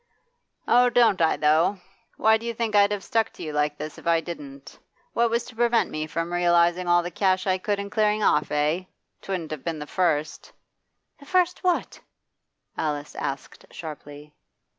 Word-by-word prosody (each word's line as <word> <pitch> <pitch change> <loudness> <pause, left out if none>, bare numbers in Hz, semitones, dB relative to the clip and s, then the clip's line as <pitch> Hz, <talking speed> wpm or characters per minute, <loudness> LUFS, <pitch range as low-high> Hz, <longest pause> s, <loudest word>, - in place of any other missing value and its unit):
'Oh, 245 +1 +5
don't 235 -6 +3
I, 160 - +3
though! 155 +6 +3 0.4
Why, 220 0 +4
do 230 +1 -8
you 235 - -3
think 225 -2 -2
I'd 205 0 +5
have 205 -2 -3
stuck 225 0 0
to - - -10
you 155 - -5
like 150 0 0
this 155 0 -7
if - - -11
I 165 -1 +4
didn't? 140 -5 -9 0.3
What 235 0 +2
was 235 +1 0
to 240 - -13
prevent 235 0 +2
me 155 0 -3
from 165 +2 -3
realising 175 0 +2
all 175 0 +4
the 175 - -5
cash 185 -1 +1
I 190 -1 +1
could 205 +2 -1
and 200 0 -6
clearing 215 -1 +1
off, - - +2
eh? 150 +5 0 0.4
'Twouldn't 180 -5 -4
have 155 -4 -6
been 165 -2 -3
the 150 - -6
first 155 -3 -1 0.3
' - - -49
'The 280 - -16
first 360 +1 +1
what?' 360 -1 0 0.8
Alice 150 -2 -3
asked 135 0 -6
sharply. 150 -2 -10
175 Hz, 185 wpm, -25 LUFS, 155-215 Hz, 0.8 s, Oh